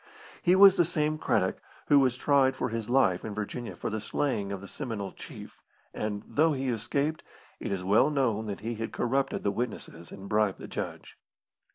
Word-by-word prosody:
He 180 Hz, +1 st, +4 dB
was 195 Hz, 0 st, +8 dB
the 175 Hz, -, +6 dB
same 155 Hz, -2 st, -1 dB
Craddock -, -, 0 dB, 0.2 s
who 145 Hz, -, +6 dB
was 130 Hz, -2 st, +2 dB
tried 135 Hz, -1 st, +3 dB
for 125 Hz, -, -2 dB
his 115 Hz, -1 st, -4 dB
life 120 Hz, -9 st, +3 dB
in 105 Hz, -2 st, -5 dB
Virginia 105 Hz, +3 st, -5 dB
for -, -, -4 dB
the 110 Hz, 0 st, -3 dB
slaying 110 Hz, -3 st, -1 dB
of 100 Hz, -, -4 dB
the 100 Hz, -, -10 dB
Seminole 110 Hz, -6 st, -5 dB
Chief, -, -, -11 dB, 0.3 s
and, 105 Hz, -1 st, -3 dB
though 160 Hz, +1 st, +2 dB
he 135 Hz, -1 st, -2 dB
escaped, 140 Hz, +7 st, -1 dB, 0.4 s
it -, -, -4 dB
was 95 Hz, -2 st, -2 dB
well 105 Hz, +9 st, +4 dB
known 120 Hz, -7 st, 0 dB
that 100 Hz, -1 st, -5 dB
he 115 Hz, +2 st, -3 dB
had 115 Hz, 0 st, -5 dB
corrupted 135 Hz, +3 st, 0 dB
the 100 Hz, -, +1 dB
witnesses 100 Hz, -6 st, -5 dB
and 100 Hz, 0 st, -9 dB
bribed 105 Hz, -2 st, +1 dB
the -, -, -9 dB
judge. -, -, -6 dB
120 Hz, 195 wpm, -29 LUFS, 105-140 Hz, 0.4 s, was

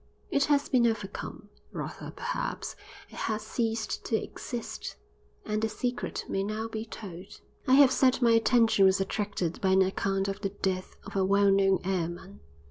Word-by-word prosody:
It 280 Hz, 0 st, +3 dB
has 285 Hz, -1 st, +2 dB
been 245 Hz, -3 st, +4 dB
overcome; 205 Hz, -1 st, -4 dB, 0.2 s
rather, -, -, -6 dB
perhaps, -, -, -4 dB, 0.4 s
it -, -, -12 dB
has 215 Hz, -1 st, -1 dB
ceased 225 Hz, -1 st, -2 dB
to 225 Hz, -, 0 dB
exist; 235 Hz, +1 st, -5 dB, 0.5 s
and 215 Hz, 0 st, -1 dB
the 220 Hz, -, +1 dB
secret 245 Hz, +3 st, -3 dB
may 195 Hz, -, -1 dB
now 215 Hz, +3 st, -2 dB
be 220 Hz, 0 st, -5 dB
told. 200 Hz, -2 st, -9 dB, 0.3 s
I 260 Hz, -, +6 dB
have 275 Hz, -2 st, +7 dB
said 260 Hz, -1 st, +3 dB
my 240 Hz, -2 st, +4 dB
attention 230 Hz, -2 st, +4 dB
was 190 Hz, 0 st, +4 dB
attracted 195 Hz, -3 st, -2 dB
by 190 Hz, -1 st, +3 dB
an 190 Hz, 0 st, +6 dB
account 195 Hz, +1 st, 0 dB
of 195 Hz, +1 st, -4 dB
the 195 Hz, -, -1 dB
death 190 Hz, -1 st, -3 dB
of 200 Hz, -, -9 dB
a 195 Hz, -, +3 dB
well 200 Hz, +1 st, +4 dB
known 195 Hz, -1 st, +3 dB
airman. 175 Hz, -, -3 dB
210 Hz, 170 wpm, -29 LUFS, 195-230 Hz, 0.5 s, have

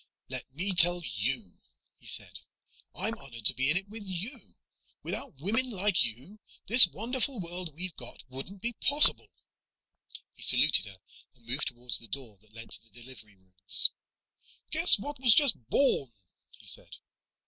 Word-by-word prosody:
"Let -, -, -10 dB
me 190 Hz, +5 st, -4 dB
tell 175 Hz, 0 st, +1 dB
you," 110 Hz, -2 st, -4 dB, 0.4 s
he -, -, -19 dB
said, -, -, -7 dB, 0.6 s
"I'm -, -, -2 dB
honored 120 Hz, -5 st, -11 dB
to -, -, +3 dB
be 130 Hz, +2 st, -3 dB
in 160 Hz, -, -1 dB
it 195 Hz, +1 st, -8 dB
with 215 Hz, +1 st, -8 dB
you. 205 Hz, +8 st, -10 dB, 0.5 s
Without 135 Hz, -, -8 dB
women 225 Hz, -, -3 dB
like 200 Hz, -3 st, +1 dB
you, 130 Hz, -, -8 dB, 0.3 s
this 230 Hz, -3 st, +8 dB
wonderful 245 Hz, +6 st, -3 dB
world 175 Hz, -3 st, -1 dB
we've 180 Hz, 0 st, -4 dB
got 120 Hz, -, -10 dB
wouldn't 155 Hz, +10 st, -11 dB
be 235 Hz, +1 st, -5 dB
possible." 290 Hz, +6 st, +4 dB, 1.0 s
He -, -, -20 dB
saluted 150 Hz, -6 st, +3 dB
her 95 Hz, -1 st, -14 dB, 0.4 s
and 120 Hz, -2 st, -26 dB
moved 125 Hz, +5 st, -5 dB
toward 120 Hz, +1 st, -11 dB
the 115 Hz, -, -15 dB
door 110 Hz, -3 st, -8 dB
that 110 Hz, +1 st, -22 dB
led 115 Hz, 0 st, -11 dB
to -, -, -1 dB
the 115 Hz, +1 st, -19 dB
delivery 120 Hz, -4 st, -15 dB
rooms. 95 Hz, 0 st, +8 dB, 0.8 s
"Guess -, -, +4 dB
what 285 Hz, +6 st, -10 dB
was 245 Hz, -4 st, +3 dB
just 160 Hz, -, 0 dB
born," 200 Hz, -, -1 dB, 0.4 s
he -, -, -21 dB
said. -, -, -10 dB
155 Hz, 160 wpm, -26 LUFS, -, 1.0 s, this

